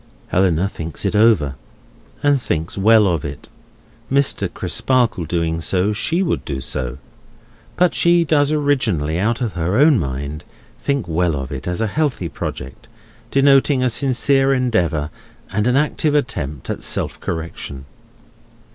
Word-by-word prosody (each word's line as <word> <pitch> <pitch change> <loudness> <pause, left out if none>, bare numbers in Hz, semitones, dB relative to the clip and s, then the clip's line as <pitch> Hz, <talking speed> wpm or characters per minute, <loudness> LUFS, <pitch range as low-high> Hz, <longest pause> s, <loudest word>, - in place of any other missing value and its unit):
Helena 90 -1 +2
thinks 80 -5 -6
it - - 0
over, 105 -11 +4 0.7
and 145 -2 +3
thinks 85 -6 -3
well 110 +1 +5
of 85 -5 0
it. 70 -1 -8 0.6
Mr. 140 0 +2
Crisparkle 120 -9 0
doing 80 0 -1
so, 95 +5 +1
she 165 - 0
would 170 - -1
do 70 -2 -4
so; 65 0 -4 0.8
but 180 -1 +3
she 170 0 +4
does 145 -2 +2
originally, 115 - 0
out 115 +4 0
of 115 -5 -2
her 85 +4 -1
own 145 -2 +5
mind, 70 +2 -4 0.4
think 140 -4 -1
well 85 0 0
of 70 0 -5
it, 70 +2 -6
as 90 +4 -2
a - - +2
healthy 125 - -1
project, 65 -2 -7 0.4
denoting 135 -1 +4
a 125 - +2
sincere 135 +2 +2
endeavour 90 - 0 0.4
and 105 +3 0
an 125 - +2
active 150 +1 +1
attempt 75 - -2
at - - -5
self - - -2
correction. 80 -5 -6
105 Hz, 145 wpm, -19 LUFS, -, 0.8 s, well